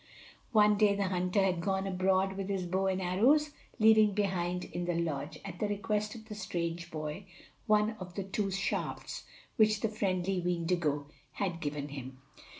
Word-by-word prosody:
One 210 -2 +5
day 205 -2 +5
the 200 -2 0
hunter 185 +2 +1
had 180 -3 +1
gone 190 +1 0
abroad 190 0 +2
with 195 0 -4
his 190 -2 -1
bow 190 +2 0
and 190 0 +1
arrows, 245 +12 +3 0.3
leaving 215 -2 +6
behind 180 -3 0
in 175 0 -4
the 175 -1 0
lodge, 155 -2 -2
at 180 -3 -7
the 210 - +1
request 210 +1 -1
of 220 -1 -11
the 215 - -6
strange 170 -4 -3
boy, 155 +5 -5 0.4
one 215 0 +4
of 180 -1 -8
the 195 - -2
two 195 +1 -1
shafts 195 +1 -3 0.3
which 215 -2 +4
the 225 - +1
friendly 190 -3 0
Weendigo 170 -4 0 0.3
had 185 -4 -2
given 145 -1 -3
to - - -9
him. 130 -2 -7
190 Hz, 175 wpm, -32 LUFS, 175-205 Hz, 0.4 s, leaving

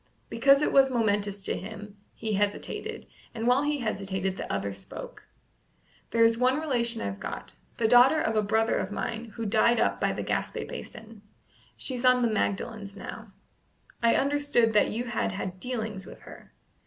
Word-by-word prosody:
Because 275 +5 +5
it - - +1
was 270 -1 +6
momentous 205 -4 0
to - - -2
him, 210 +1 -8 0.2
he 220 -1 -3
hesitated, 205 0 -2 0.3
and 225 0 -3
while 250 +3 +4
he 295 -1 -1
hesitated 195 -4 -2
the - - -5
other 100 0 -2
spoke. 100 0 -9 0.8
"There 230 0 +3
is 230 0 +4
one 255 +3 +3
relation 240 -6 0
I've 100 0 -4
got, - - -6 0.2
the 225 - +2
daughter 245 +6 +6
of 220 - 0
a 215 - +4
brother 220 +2 +1
of - - -3
mine 230 +2 -3
who 225 0 -7
died 220 +3 +3
up - - +1
by - - +2
Gaspé - - -3
Basin. 225 -2 -9 0.6
She's 255 -2 -2
on 255 -1 +5
the 230 -2 +1
Magdalens 200 0 -2
now. - - -9 0.7
I 230 -1 +4
understood 280 -5 +2
that 210 - +4
you 230 +3 -2
had 240 -4 -2
had 185 -1 -5
dealings 220 -4 -4
with - - -12
her." - - -13
225 Hz, 170 wpm, -28 LUFS, 205-245 Hz, 0.8 s, was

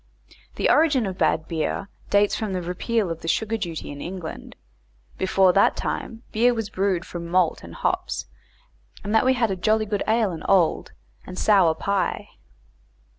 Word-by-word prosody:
the - - +1
origin 290 -7 +4
of 190 -2 -4
bad 160 - +1
beer 165 +4 -2 0.2
dates 205 0 +3
from 215 -3 -3
the 185 - -2
repeal 185 +3 -1
of 165 - -6
the - - -7
sugar 220 +6 0
duty 170 -9 -5
in 145 0 -8
England; 180 -3 -7 0.6
before 190 -1 +3
that 195 - +4
time 225 +1 -4
beer 240 +2 +3
was 220 -2 -4
brewed 190 -3 0
from 170 -1 -7
malt 175 -1 +1
and 85 0 -10
hops, - - -2 0.8
and 205 +2 -3
that 225 - +4
we 260 0 +4
had 215 -7 0
"jolly 215 +1 +2
good 205 -1 -2
ale 220 -2 +2
and 165 - -7
old," 185 -5 +2 0.4
and 185 - -8
sour 190 -7 +4
pie. 200 +3 -1
195 Hz, 170 wpm, -24 LUFS, 175-220 Hz, 0.8 s, origin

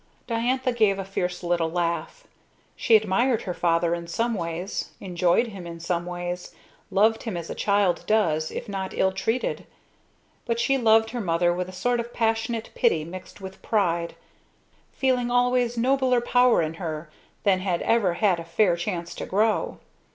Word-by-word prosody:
Diantha 250 +2 0
gave 215 -5 +2
a 195 - -4
fierce 180 -2 -3
little 170 -2 +1
laugh. 175 - -2 0.5
She 230 - +4
admired 220 +3 +2
her 180 - -3
father 170 0 +1
in 170 0 -4
some 230 +7 -1
ways, 175 0 -4
enjoyed 180 +5 +1
him 190 -5 -8
in 170 0 -8
some 170 +1 -2
ways, 175 0 -5 0.3
loved 215 +3 +3
him 220 -7 -4
as 170 -1 -6
a - - -2
child 200 -3 +1
does 160 -8 +2
if - - -6
not 195 -2 -4
ill 190 - +3
treated; 225 +6 -2 0.8
but 230 0 0
she 270 +3 +2
loved 225 -3 +4
her 240 -1 -3
mother 175 -2 +2
with 180 +1 -3
a - - -8
sort 240 +7 0
of 235 +1 -5
passionate 225 0 -1
pity 170 -11 +2
mixed 185 +4 -10
with 190 0 -9
pride; 170 -6 0 0.8
feeling 250 -2 0
always 245 -1 +2
nobler 255 +1 +2
power 245 -4 +3
in 155 0 -3
her 155 -2 -4 0.4
than 190 -2 +3
had 185 -2 -1
ever 205 -7 +2
had 185 -2 +2
a - - -5
fair 170 +2 +2
chance 170 0 -4
to - - -6
grow. 215 +3 +1
195 Hz, 170 wpm, -25 LUFS, 175-230 Hz, 0.8 s, She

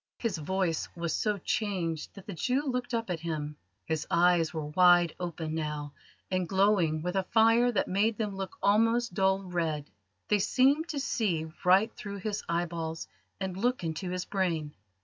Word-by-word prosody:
His 215 -8 -2
voice 175 +1 -1
was 170 -2 -2
so 210 -2 0
changed 180 -6 -2
that 195 - -11
the 200 - -6
Jew 255 - 0
looked 250 -2 -2
up 230 -5 -1
at 170 - -2
him. 155 -3 -4 0.3
His 160 -1 -2
eyes 170 -1 +3
were 160 -3 -4
wide 175 +1 +5
open 165 -3 -4
now, 150 -2 -3 0.4
and 185 -2 0
glowing 190 -6 +2
with 180 +2 -2
a 190 - +3
fire 230 +2 +5
that 205 - 0
made 210 +3 +1
them 210 -3 -2
look 195 0 -6
almost 230 +2 +3
dull 190 +1 +2
red. 165 -5 -2 0.4
They 210 - +3
seemed 275 - +3
to 290 - -2
see 170 - -1
right 195 +5 +4
through 200 -1 -7
his 205 +1 -3
eyeballs 170 -1 -2 0.3
and 190 -2 -3
look 245 +2 0
into 165 +3 -3
his 180 0 -3
brain. 165 -6 -1
185 Hz, 170 wpm, -29 LUFS, 165-210 Hz, 0.4 s, wide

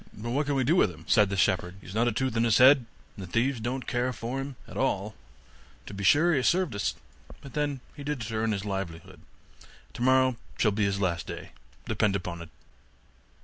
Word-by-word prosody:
'But 115 +3 -5
what 145 +3 0
can 145 - 0
we 135 - +2
do 150 +7 +3
with 145 - +4
him?' 80 -2 -12
said 105 -2 +4
the 100 - -2
shepherd, 90 -1 +1
'he - - -18
has 95 - -9
not 115 +3 +2
a - - +2
tooth 130 +2 -1
in 115 - +2
his 115 -2 +4
head, 130 -1 +6 0.3
and 100 - -8
the - - -17
thieves 125 +2 +1
don't 125 +3 -3
care 125 +1 0
for 125 +2 -4
him 135 0 -6
at - - -11
all; - - -1 0.7
to - - -9
be 100 0 -5
sure 155 - +5
he 155 - +2
has 130 - +1
served 180 -7 +2
us, 100 - -1 0.4
but 140 - -12
then 145 -3 -1
he 145 - -8
did 145 -4 -3
it - - -5
to 115 - -6
earn 110 0 0
his 100 -1 -3
livelihood; 95 -2 -5 0.7
tomorrow 130 +1 +3 0.2
shall 105 - +3
be 100 +1 0
his 100 0 -1
last 85 -5 -1
day, - - -7 0.3
depend 105 -2 +1
upon 90 -3 -4
it. 85 - -10
115 Hz, 230 wpm, -28 LUFS, 100-130 Hz, 0.7 s, head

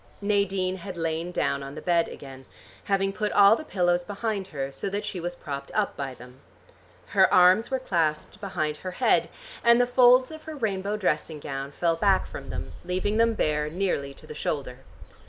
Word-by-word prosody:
Nadine 195 -2 0
had 185 0 -8
lain 165 +1 -2
down 140 -5 0
on 140 +1 -8
the - - -6
bed 170 -2 +2
again, 135 -1 -11 0.4
having 195 -1 +1
put 210 +1 -2
all 200 +1 +7
the 310 - -6
pillows 175 - +1
behind 205 0 -3
her, 140 -5 -4
so 195 - -3
that 205 +2 -3
she 205 -3 -4
was 175 +1 -3
propped 140 -4 -6
up 210 -2 0
by 135 -2 -5
them. 125 +2 -14 0.7
Her - - +4
arms 185 +5 +5
were 265 - 0
clasped 170 -3 -1
behind 155 -6 -2
her 185 - -6
head, - - +3 0.3
and 235 0 +6
the 245 - +5
folds 250 +2 +5
of 315 0 -10
her 315 -1 -6
rainbow 205 -5 -2
dressing 155 -5 -1
gown 135 0 -5
fell 165 +3 0
back 195 +2 +3
from - - -9
them - - -5
leaving 185 +4 -1
them 230 0 +3
bare 150 -5 0
nearly 165 -5 -1
to - - -15
the - - -8
shoulder. 135 -4 -3
185 Hz, 190 wpm, -26 LUFS, 150-205 Hz, 0.7 s, all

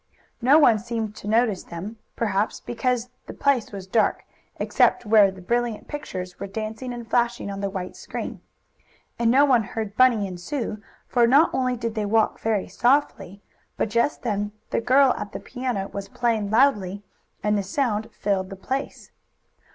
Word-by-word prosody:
No 265 +5 +6
one 240 -8 +5
seemed 225 -1 -4
to - - -9
notice 220 -3 +2
them, 190 +7 -8 0.2
perhaps 210 -2 0
because 245 0 -2 0.2
the - - -8
place 275 -5 +1
was 195 -2 -7
dark, 215 +3 +1 0.3
except - - +2
where 210 -2 +6
the 190 -1 -10
brilliant 235 +2 -1
pictures 185 -12 -6
were 200 - -4
dancing 220 +5 -5
and 240 -1 -7
flashing 235 -3 0
on 195 0 -5
the 200 - -1
white 185 -2 -5
screen. - - -6 0.8
And 235 -1 +3
no 270 +4 +6
one 255 -5 +4
heard 215 -1 -5
Bunny 240 -5 +4
and 180 -2 -7
Sue, 220 0 -4 0.3
for 240 -2 +3
not 280 +7 +5
only 255 -1 0
did 230 -1 -3
they 215 -2 -2
walk 220 +1 +2
very 220 -3 0
softly, 240 -6 0 0.3
but - - 0
just 235 +6 +1
then 205 -3 -2 0.2
the - - +1
girl 265 +2 +5
at 210 +1 -6
the - - -4
piano 245 -6 -3
was 200 0 -6
playing 225 -4 0
loudly, 205 -5 +2 0.4
and 210 0 +2
the 205 - +1
sound 220 +1 -1
filled 195 -3 -1
the 195 - -7
place. 265 +8 -5
220 Hz, 175 wpm, -24 LUFS, 200-245 Hz, 0.8 s, No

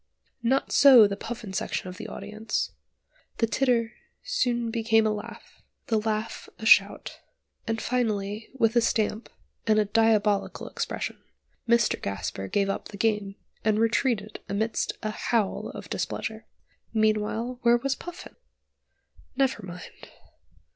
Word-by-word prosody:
Not 260 +4 +1
so 260 -6 +8
the 200 -1 -1
Puffin 225 -1 -7
section 190 - -2
of 180 0 -8
the - - -7
audience; 215 +2 -3 0.7
the 230 - +3
titter 230 0 +1 0.3
soon 245 - 0
became 225 -1 +3
a 215 - +2
laugh, 210 - -9 0.3
the 220 -2 +3
laugh 215 +1 -3
a 220 - -7
shout, 205 -2 +4 0.5
and 225 0 -1
finally 215 -4 -1
with 230 -3 +2
a 235 - +5
stamp, 220 0 0 0.4
and 215 -1 +4
a 215 - +4
diabolical 210 -1 +2
expression, - - -4 0.5
Mr 235 -1 +3
Gasper 95 0 -4
gave 200 - +1
up 195 - -3
the 200 - -10
game, 210 -2 0 0.3
and 215 -1 +2
retreated 225 -2 +1
amidst 220 +2 -1
a 215 - -1
howl 215 -2 -1
of - - -8
displeasure. - - -4 0.5
Meanwhile 220 +3 +1
where 240 0 +5
was 270 +3 -1
Puffin? 350 +5 -9 1.0
Never 265 -5 +1
mind. 180 -1 -10
220 Hz, 135 wpm, -27 LUFS, 210-235 Hz, 1.0 s, so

